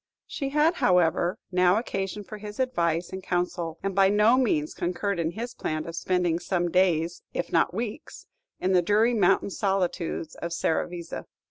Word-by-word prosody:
She 275 -2 -4
had, 305 +4 +2
however, 180 +1 +2
now 180 +1 +4
occasion 195 -2 -3
for 210 +1 -9
his 210 +2 -8
advice 170 -10 0
and 190 - -5
counsel, 175 -2 -2
and 195 0 -1
by 195 0 +5
no 210 +4 +5
means 160 - +1
concurred 180 +2 -2
in 165 0 -1
his 235 +2 -5
plan 155 0 -3
of 165 - -6
spending 175 -1 0
some 175 -1 -1
days, 175 -2 +2
if 175 - -2
not 165 - +3
weeks, 230 - -6 0.3
in 185 - 0
the 180 -1 +5
dreary 215 +6 +3
mountain 200 -2 +2
solitudes 185 -5 -1
of 170 0 -5
Serravezza. 170 0 -2
180 Hz, 165 wpm, -26 LUFS, 170-210 Hz, 0.3 s, by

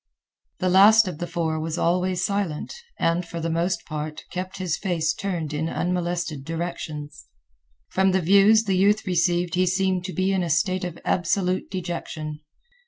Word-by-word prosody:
The 185 - 0
last 205 +3 +7
of 170 -4 -5
the 175 - -3
four 160 -2 -1
was 160 +1 -3
always 180 +1 +1
silent 200 -7 -2 0.2
and, 170 +2 +1
for 170 0 -7
the 165 0 -2
most 170 +3 -1
part, 155 -1 -5
kept 185 +1 -5
his 180 -4 -1
face 170 -4 0
turned 170 -6 -3
in 160 +2 -1
unmolested 175 -5 -2
directions. 155 -2 -5 0.6
From 190 0 +2
the 190 - +2
views 200 +5 +5
the 195 -3 0
youth 205 +3 +3
received 175 -1 +1
he 185 +1 +2
seemed 190 -1 +1
to 185 - -5
be 185 +1 +1
in 190 -1 +1
a 175 - -2
state 185 +4 +1
of 175 -2 -5
absolute 185 +1 0
dejection. 170 -4 -5
175 Hz, 170 wpm, -24 LUFS, 165-185 Hz, 0.6 s, last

